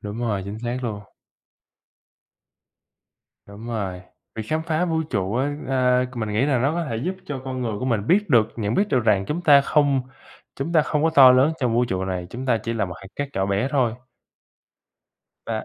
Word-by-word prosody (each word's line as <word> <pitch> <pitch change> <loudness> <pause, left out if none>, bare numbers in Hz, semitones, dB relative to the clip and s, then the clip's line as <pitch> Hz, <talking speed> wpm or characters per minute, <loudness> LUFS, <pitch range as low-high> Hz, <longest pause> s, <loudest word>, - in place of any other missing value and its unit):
Đúng 105 +2 -6
rồi, 105 -5 -1
chính 105 +2 -6
xác 120 +1 -3
luôn. 105 -4 -4 2.4
Đúng 100 +3 -11
rồi, 100 -6 -4 0.3
việc 110 - -4
khám 155 +1 0
phá 160 +1 0
vũ 160 -2 0
trụ 100 -2 -1
á, 145 +3 -1
ơ, 125 -1 +2
c - - -12
mình 110 -2 -3
nghĩ 115 +7 +1
là 135 -4 +2
nó 140 +5 +1
có 170 0 -2
thể 115 - -2
giúp 180 +11 -3
cho 140 -3 -5
con 130 -1 -4
người 115 -2 -2
của 125 - -4
mình 115 -4 -1
biết 200 0 +2
được, 110 -4 +4
nhận 105 0 -2
biết 205 +1 +1
được 130 -9 +2
rằng 100 -3 +3
chúng 155 - -2
ta 145 -4 +7
không 140 -2 +2 0.5
chúng 150 +5 -3
ta 155 -2 +5
không 150 -1 -1
có 160 - +3
to 130 -3 +9
lớn 130 +5 +4
trong 120 -3 +1
vũ 120 +1 +3
trụ 95 -5 -2
này, 90 -2 -4
chúng 130 +2 -6
ta 115 -3 +2
chỉ 115 0 -4
là 110 -4 0
một 90 -2 -7
hạt 95 - -11
cát 145 -1 -3
nhỏ 95 0 0
bé 100 +7 0
thôi. 125 -6 +1 1.5
Và 110 -1 -3
125 Hz, 220 wpm, -23 LUFS, 110-145 Hz, 2.4 s, to